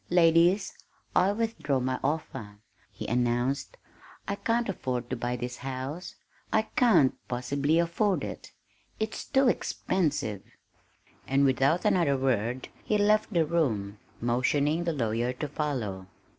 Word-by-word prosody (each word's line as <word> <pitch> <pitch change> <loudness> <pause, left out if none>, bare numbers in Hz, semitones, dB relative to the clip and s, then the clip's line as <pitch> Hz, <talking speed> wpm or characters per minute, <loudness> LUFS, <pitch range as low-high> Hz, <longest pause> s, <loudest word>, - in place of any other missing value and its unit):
"Ladies, 175 +3 +4 0.4
I 185 +2 +4
withdraw 215 -11 -1
my 130 0 -1
offer," 110 -9 -3 0.3
he - - -7
announced. 120 +3 0 0.5
"I 200 - 0
can't 230 +3 0
afford 125 - -3
to - - 0
buy 120 0 -2
this 125 0 -5
house 135 +7 -5 0.4
I 220 - +3
can't 225 - +5
possibly 140 +5 0
afford 170 +4 +1
it - - -7 0.5
it's 220 0 -3
too 270 -1 +3
expensive." 150 - 0 0.9
And 135 +1 +3
without 135 +5 +2
another 160 -7 +3
word 125 -1 -1
he 215 - +1
left 210 +2 +3
the 170 -5 +3
room, 110 -12 -1 0.2
motioning 140 +7 +1
the 170 - 0
lawyer 120 -2 0
to 145 +4 -4
follow. 120 -11 -3
140 Hz, 130 wpm, -28 LUFS, 125-175 Hz, 0.9 s, can't